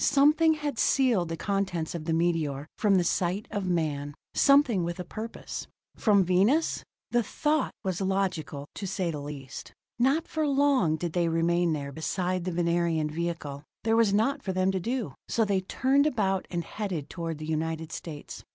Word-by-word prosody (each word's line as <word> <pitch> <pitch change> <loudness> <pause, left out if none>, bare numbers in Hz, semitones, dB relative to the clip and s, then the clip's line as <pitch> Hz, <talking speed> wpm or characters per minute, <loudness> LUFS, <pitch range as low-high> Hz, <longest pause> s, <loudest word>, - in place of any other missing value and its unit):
Something 305 +3 +5
had 295 -5 -3
sealed 235 - +3
the 165 - -3
contents 190 -4 -1
of 165 -3 -5
the 165 - 0
meteor 160 -4 0
from 205 -3 +4
the 180 - +4
sight 180 +4 0
of 200 -4 -2
man, 145 -5 -1 0.2
something 275 -9 +4
with 170 +1 -3
a - - -2
purpose. 225 +4 -6 0.3
From 205 -3 +4
Venus? 195 - +2 0.3
The 240 - +3
thought 295 +6 0
was 190 -2 -2
logical, 185 -7 -1
to 200 - -5
say 185 -2 -1
the 150 -2 -5
least. 140 -2 -8 0.3
Not 275 +7 +2
for 315 -1 -1
long 275 - +3
did 170 0 -4
they 175 -1 +2
remain 170 +1 +2
there 140 -2 -4
beside 180 +4 -2
the 185 - -1
Venerian 170 -2 +1
vehicle; 160 -4 -3 0.2
there 225 0 +2
was 225 -3 +4
naught 235 +8 +2
for 190 - -3
them 185 +1 +2
to 190 - -1
do, 230 - -2
so 225 - +2
they 200 -2 +1
turned 270 +9 +2
about 195 -9 0
and 170 -1 -2
headed 185 -9 -4
toward 165 -3 -4
the 155 - -6
United 160 0 -2
States. 150 -4 -7
185 Hz, 180 wpm, -28 LUFS, 165-225 Hz, 0.3 s, Something